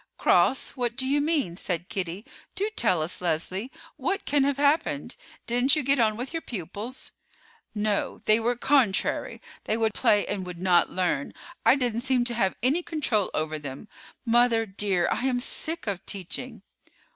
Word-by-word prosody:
"Cross—what 250 -2 +2
do 260 - -1
you 285 +2 +2
mean?" 290 - 0
said 175 -1 -3
Kitty. 190 +2 -4 0.3
"Do 405 +4 -1
tell 185 - +2
us, 170 +4 -2
Leslie, 180 +7 -1 0.3
what 355 +9 -2
can 285 -1 +3
have 280 -1 0
happened. 290 +3 +1 0.3
Didn't 245 +4 +3
you 305 - 0
get 275 +1 +2
on 215 -2 +2
with 255 +6 -5
your 330 - -2
pupils?" 210 - -6 0.6
"No, 210 -1 -1
they 215 +1 +4
were 240 +2 0
contrary; 245 -6 +1 0.2
they 220 - 0
would 220 -2 +1
play 205 -1 +3
and 200 -2 -3
would 180 -1 -7
not 180 -1 +3
learn. 175 -6 -1 0.3
I - - +6
didn't 240 -4 -1
seem 255 -1 +2
to 240 0 -2
have 195 -5 +1
any 280 +8 +2
control 265 - 0
over 155 0 -2
them. 140 +6 -8 0.4
Mother, 235 -1 +3
dear, 190 -3 0
I 260 - 0
am 250 -2 +1
sick 320 +6 -3
of 195 -3 -3
teaching!" 205 +4 -5
230 Hz, 170 wpm, -26 LUFS, 190-265 Hz, 0.6 s, I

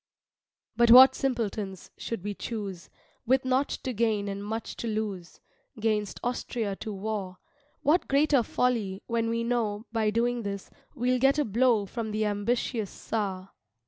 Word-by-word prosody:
But 235 +1 +4
what 255 +3 +10
simpletons, 210 -7 -3
should 230 -6 -5
we 205 0 -3
choose, 200 -6 -6 0.4
With 260 +1 +3
nought 260 +2 +2
to 255 - -4
gain 215 -2 0
and 200 0 -4
much 220 +2 -4
to 235 - -4
loose, 210 -5 -4 0.4
'Gainst 210 -2 -1
Austria 235 -4 -2
to 220 - -6
war; 195 -2 -4 0.5
What 320 +5 +3
greater 280 -1 +4
folly, 220 -5 -1
when 230 -1 -1
we 230 0 -1
know 225 -3 -1
By 220 -2 +1
doing 235 +2 0
this, 200 -2 -5 0.2
we'll 250 0 +1
get 270 +3 +4
a 295 - +2
blow 225 -1 +2
From 225 +2 -4
the 215 0 -1
ambitious 210 +1 -1
Czar. 195 -4 -4
225 Hz, 150 wpm, -28 LUFS, 205-245 Hz, 0.5 s, what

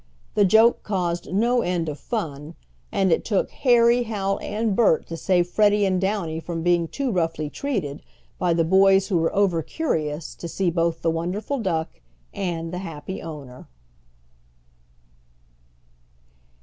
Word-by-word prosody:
The 205 - +4
joke 220 +5 +5
caused 175 -4 -2
no 235 +5 +2
end 175 -4 -1
of 150 -2 -5
fun, 155 - -5 0.4
and 190 -2 +1
it 165 - +2
took 205 -4 0
Harry, 240 -1 +4
Hal, 200 -4 -2
and 215 0 -1
Bert 210 -8 +3
to 165 - -4
save 175 +1 +2
Freddie 205 +2 +3
and 185 -1 +1
Downy 190 -5 -1
from 165 0 -5
being 175 -1 +2
too 270 - -2
roughly 165 -5 -1
treated, 195 - -3 0.4
by 180 -3 +2
the 165 - +2
boys 190 +3 +4
who 180 -4 +2
were 165 - 0
over 190 -5 +2
curious 155 - -3
to 170 - -8
see 175 +1 -1
both 165 -1 -1
the 165 - +2
wonderful 185 +11 -3
duck 165 - -2 0.3
and 170 -3 -3
the 180 - -3
happy 170 0 -7
owner. 140 -6 -9
180 Hz, 150 wpm, -23 LUFS, 165-205 Hz, 0.4 s, joke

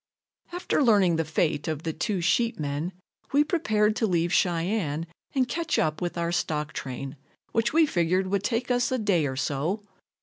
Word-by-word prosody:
After 355 -3 0
learning 200 - +4
the 165 - +1
fate 155 -1 0
of 155 -1 -3
the 160 - -2
two 190 +3 -1
sheepmen 165 -5 0 0.4
we 290 +1 +5
prepared 215 - +1
to 225 - +1
leave 175 -2 +1
Cheyenne 170 -3 +1 0.3
and 260 -2 +2
catch 325 +5 -1
up 155 +1 0
with 175 0 -3
our 170 0 0
stock 150 -3 -1
train, 135 +1 -6 0.3
which 230 +1 +1
we 320 +1 +5
figured 185 - +1
would 195 +1 0
take 240 +2 -1
us 245 0 +1
a 260 - +1
day 195 - +2
or 130 - -4
so. 150 +10 -1
180 Hz, 175 wpm, -26 LUFS, 155-230 Hz, 0.4 s, we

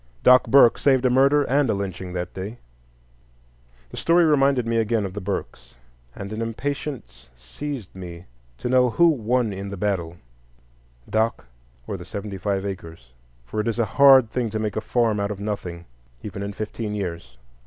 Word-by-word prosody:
Doc 125 0 +6
Burke 135 -4 +6
saved 130 -2 +3
a 125 - +4
murder 140 +3 +4
and 140 -1 +1
a - - +2
lynching 95 -2 -5
that 90 -1 -4
day. 100 +5 -6 1.3
The - - -9
story 170 +1 +4
reminded 140 -5 +3
me 115 0 0
again 110 -1 +1
of 95 - -6
the 105 - -5
Burkes, 100 +1 -5 0.4
and 100 +2 -7
an 110 - -4
impatience 115 - -5
seized 105 - -7
me 90 -2 -9 0.3
to - - -4
know 125 0 +4
who 170 +8 +4
won 120 -5 0
in 100 +1 -6
the 100 - -6
battle, 90 -4 -2 0.9
Doc 110 +1 0 0.4
or - - -4
the - - -9
seventy 100 -1 -6
five 100 0 -1
acres. 80 -10 -8 0.3
For 110 - -5
it 105 - -1
is 115 - -1
a 115 - +2 0.2
hard 135 -5 +8
thing 120 -3 -1
to 110 - -3
make 110 -1 -2
a 110 - -1
farm 115 -3 +1
out 100 0 -1
of 105 -2 -5
nothing, 90 -5 -5 0.4
even 100 -1 -6
in 100 0 -4
fifteen 105 +1 -4
years. 85 -11 -5
110 Hz, 180 wpm, -23 LUFS, 95-125 Hz, 1.3 s, hard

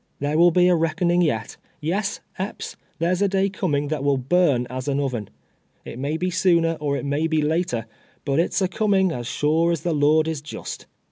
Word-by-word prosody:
Tliere 145 +2 -1
will 170 +2 +6
be 180 +1 +4
a 180 - +5
reckoning 170 +2 +1
yet 115 -10 -1
— - - -38
yes, 195 +7 -2 0.2
Epps, 190 +2 -5 0.2
there's 175 +4 0
a 200 - +4
day 195 0 +1
coming 145 -7 -1
that 150 -3 -2
will 140 -1 +2
burn 135 -2 +2
as 130 +2 -6
an 140 0 0
oven. 125 -7 -2 0.6
It 120 - -8
may 145 +4 -1
be 180 +2 -1
sooner 170 -2 +3
or 145 -1 -1
it - - -5
may 145 +3 0
be 160 -2 +1
later, 155 -7 0 0.4
but 140 +1 +1
it's 185 +3 +1
a - - +2
coming 190 -1 +2
as 120 -5 -5
sure 160 +5 +1
as 165 - -1
the 175 - -1
Lord 155 +2 +3
is 160 -3 -3
just." 150 - -8
160 Hz, 210 wpm, -23 LUFS, 145-180 Hz, 0.6 s, will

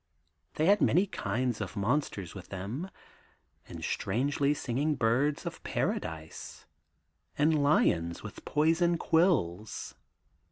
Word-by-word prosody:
They 155 - +1
had 200 +3 +5
many 185 +3 +4
kinds 125 - -2
of - - -5
monsters 100 - -1
with 95 -3 -10
them, 105 - -5 0.8
and - - -8
strangely 140 +7 0
singing 140 +4 -1
birds 130 +5 +1
of - - -5
paradise, 80 -1 -4 0.7
and 150 +1 +3
lions 85 - +2
with - - -9
poison 165 +3 +2
quills. 130 - +1
140 Hz, 110 wpm, -30 LUFS, 100-155 Hz, 0.8 s, had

